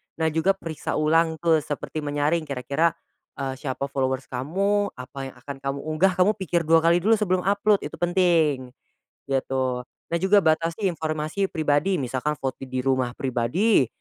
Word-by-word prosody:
nah 160 0 0
juga 165 +5 +2
periksa 165 -5 -5
ulang 160 +1 +2
ke 165 -2 +4
seperti 150 +1 -5
menyaring 150 +2 0
kira-kira, 140 +4 0 0.5
eee, 135 -1 -3
siapa 135 -2 -4
followers 130 -1 -1
kamu 195 +11 0
apa 135 +2 -7
yang 135 - -11
akan 140 +3 -8
kamu 135 +1 -3
unggah 155 +4 +2
kamu 185 +2 +4
pikir 175 -2 0
2x 165 +2 +4
dulu 220 +1 +4
sebelum 185 -3 +1
upload 205 +1 +2
itu - - -7
penting, 165 -7 +2 0.5
gitu. 130 -2 -1 0.2
Nah 170 - +2
juga 195 +2 +4
batasi 165 +4 +1
informasi 155 +3 -2
pribadi 155 +2 +1
misalkan 135 0 -2
foto 135 -1 -5
di 130 0 -3
rumah 130 -2 0
pribadi, 130 - +2
155 Hz, 155 wpm, -24 LUFS, 135-175 Hz, 0.5 s, ke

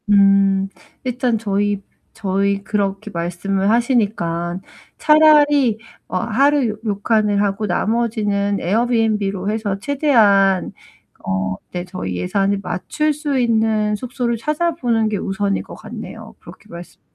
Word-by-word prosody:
음. 195 -1 +4 0.4
일단 250 -2 0
저희 205 -1 -1 0.3
저희 200 -1 -1
그렇게 200 0 -2
말씀을 185 +3 -1
하시니깐 200 -8 0 0.4
차라리 295 -6 +5 0.3
어 - - -2
하루 245 +2 +1
료칸을 210 -1 +1
하고 205 +1 -1
나머지는 205 0 0
에어비앤비로 210 -2 0
해서 210 -2 -2
최대한 210 - +3 0.5
어 95 0 -1 0.2
네 175 0 -4
저희 180 - -5
예산을 195 - 0
맞출 300 - -1
수 290 -2 -2
있는 220 -3 +1
숙소를 245 +1 -2
찾아보는 300 -5 0
게 215 - -2
우선일 200 +1 -2
것 - - -11
같네요. - - -9
그렇게 - - -14
말씀해 170 +1 -11
210 Hz, 265 characters per minute, -19 LUFS, 195-235 Hz, 0.5 s, 차라리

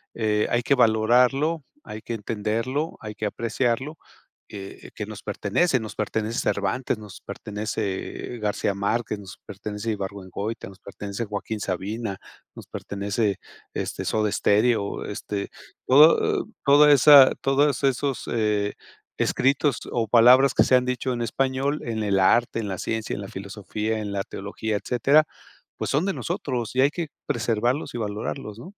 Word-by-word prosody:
eh, 105 -2 +1
hay 120 - +2
que 140 - +3
valorarlo, 125 +7 +3 0.2
hay 105 0 -7
que 115 - -5
entenderlo, 115 +8 -2
hay 105 -1 -7
que 105 - -4
apreciarlo, 120 +7 -1 0.5
eh 100 -1 -9
eh, - - -10
que 105 - -4
nos 110 -1 -9
pertenece. 105 - +1
Nos 110 -1 -7
pertenece 110 +1 -2
Cervantes, 100 +5 -1
nos 105 -3 -11
pertenece, 105 +2 -4
eh, - - -9
García 105 -1 -1
Márquez, 105 +2 -1
nos 100 -1 -11
pertenece 105 +2 -5
Ibargüengoitia, 100 +1 -5
nos 95 - -15
pertenece 100 +3 -6
Joaquín 105 +1 -4
Sabina, 100 +2 -3 0.4
nos - - -11
pertenece, 100 0 -2 0.4
este, - - -4
Soda 105 -2 0
Stereo, 105 0 +1
este, 100 0 -4 0.4
todo 150 +10 +5 0.2
toda 145 +1 +7
esa 140 0 +8
todos 140 0 +2
esos, 135 0 0
eh, 105 -3 0 0.4
escritos 135 0 +2
o 115 -2 0
palabras 125 +3 +6
que - - +5
se 130 - +4
han 125 - +4
dicho 125 0 -1
en 120 - -3
español 135 +4 0
en 110 -2 -2
el 100 -2 +1
arte, 115 +5 +3
en 105 - -3
la 95 - -3
ciencia, 110 -1 -3
en 100 - -6
la 100 - -7
filosofía, 105 +3 -4
en 105 -1 -4
la 100 -1 -1
teología, 105 +2 -4
etcétera, 135 +8 +3 0.5
pues - - -3
son 150 +6 +1
de 195 - 0
nosotros, 130 - -3
y 130 - +4
hay 140 - +5
que 170 -2 -4 0.2
preservarlos 120 +4 0
y - - -3
valorarlos, 105 0 -4
¿no? - - -9
110 Hz, 155 wpm, -24 LUFS, 105-130 Hz, 0.5 s, esa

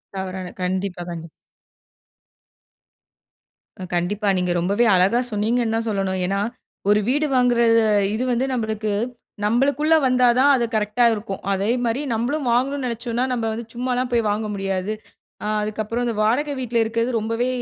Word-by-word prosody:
தவறான, 190 -1 -4 0.2
கண்டிப்பா. 185 0 -2
கண்டிப்பா. 165 -1 -7 2.6
கண்டிப்பா. 200 +4 -1
நீங்க 180 -1 0
ரொம்பவே 200 +7 +2
அழகா 195 +7 +3
சொன்னீங்கனு 225 +2 0
தான் 225 0 -1
சொல்லணும். 195 -2 -1
ஏன்னா, 195 +2 0 0.5
ஒரு 210 0 +5
வீடு 295 +3 +2
வாங்குறது. 235 -2 +4 0.3
இது 245 - -1
வந்து 245 +2 +1
நம்மளுக்கு, 220 -3 -2 0.5
நம்மளுக்குள்ள 280 +7 +3
வந்தா 250 -1 +4
தான் 285 +2 +6
அது 240 -2 +1
கரெக்ட்டா 215 +3 +2
இருக்கும். 205 -2 -5
அதே 195 +3 0 0.2
மாரி, 235 +5 0
நம்ளும் 255 +5 -1
வாங்கணும்னு 265 +2 0
நெனச்சோம்னா 235 +1 -2
நம்ம 230 -2 -1
வந்து 230 +1 -5
சும்மால்லாம் 250 +1 -1
போயிவாங்க 215 -2 +1
முடியாது. 195 +1 -2 0.5
ஆ, - - -2
அதுக்கப்பறம் 215 +3 -2
இந்த 230 - -2
வாடகை 285 +7 +1
வீட்ல 240 -2 -2
இருக்கறது 230 +2 -1
ரொம்பவே 230 +3 -1
225 Hz, 135 wpm, -22 LUFS, 205-245 Hz, 2.6 s, தான்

